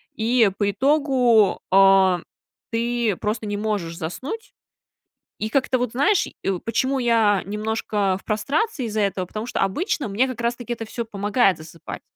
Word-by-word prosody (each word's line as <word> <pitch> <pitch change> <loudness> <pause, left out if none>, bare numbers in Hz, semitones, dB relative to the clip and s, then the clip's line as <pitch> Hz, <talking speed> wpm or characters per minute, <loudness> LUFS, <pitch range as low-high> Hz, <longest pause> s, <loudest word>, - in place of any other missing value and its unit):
И 225 -1 +3
по 205 -1 +2
итогу, 250 -4 +3
а, 190 -2 +5 0.5
ты 235 -2 0
просто 215 +1 -3
не 205 0 -2
можешь 205 -6 -2
заснуть. 330 - -6 0.9
И 215 - -2
как-то 260 +1 +1
вот, 245 -2 -1
знаешь, 355 - +2
и, - - -14
э, 190 -2 -1
почему 260 +4 0
я 225 -5 +3
немножко 210 -1 -1
в - - -22
прострации 275 - -1
из-за 215 0 -2
этого: 195 -2 -1
потому 215 +5 -6
что - - -2
обычно 285 - -1
мне 225 +7 +1
как 250 -2 -6
раз-таки 240 0 -2
это 230 - -6
всё 235 +1 -5
помогает 205 -2 +1
засыпать. 160 +1 -9
220 Hz, 160 wpm, -23 LUFS, 200-250 Hz, 0.9 s, а